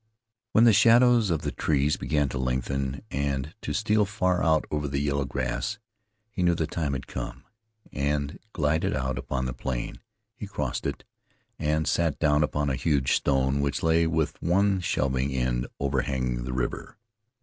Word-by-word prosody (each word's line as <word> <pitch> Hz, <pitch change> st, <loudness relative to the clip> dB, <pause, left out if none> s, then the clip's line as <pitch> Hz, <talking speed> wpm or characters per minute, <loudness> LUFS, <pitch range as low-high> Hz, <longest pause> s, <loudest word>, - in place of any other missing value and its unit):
When 110 Hz, -, +5 dB
the 115 Hz, -2 st, +7 dB
shadows 115 Hz, +1 st, +5 dB
of 80 Hz, -3 st, 0 dB
the 75 Hz, -, -1 dB
trees 75 Hz, +3 st, +1 dB
began 75 Hz, -2 st, 0 dB
to 65 Hz, -, -4 dB
lengthen, 65 Hz, +2 st, -2 dB
and 70 Hz, +1 st, -2 dB
to -, -, -4 dB
steal 110 Hz, -1 st, +2 dB
far 95 Hz, -3 st, 0 dB
out 80 Hz, -1 st, +3 dB
over 75 Hz, -1 st, -1 dB
the 70 Hz, 0 st, -2 dB
yellow 70 Hz, 0 st, 0 dB
grass, 65 Hz, -, -2 dB, 0.5 s
he 100 Hz, -, -4 dB
knew 85 Hz, -1 st, +3 dB
the 80 Hz, -, 0 dB
time 75 Hz, -3 st, -2 dB
had 65 Hz, 0 st, -4 dB
come, -, -, -6 dB, 0.5 s
and 70 Hz, 0 st, -1 dB
glided 75 Hz, -3 st, 0 dB
out 65 Hz, 0 st, -2 dB
upon 65 Hz, 0 st, -3 dB
the 65 Hz, -, -2 dB
plain. 60 Hz, -1 st, -4 dB, 0.4 s
He -, -, -7 dB
crossed -, -, -3 dB
it, -, -, -5 dB, 0.6 s
and 75 Hz, 0 st, 0 dB
sat 85 Hz, -4 st, +1 dB
down 75 Hz, -1 st, +3 dB
upon 75 Hz, -1 st, 0 dB
a -, -, 0 dB
huge 70 Hz, -1 st, +1 dB
stone 70 Hz, 0 st, +1 dB
which 70 Hz, -1 st, -1 dB
lay 80 Hz, 0 st, +3 dB
with 80 Hz, -1 st, -1 dB
one 95 Hz, +3 st, +2 dB
shelving 65 Hz, -5 st, 0 dB
end 60 Hz, -1 st, 0 dB
overhanging 65 Hz, -3 st, -1 dB
the 65 Hz, -, -4 dB
river. 65 Hz, +8 st, -3 dB
70 Hz, 170 wpm, -27 LUFS, 65-80 Hz, 0.6 s, the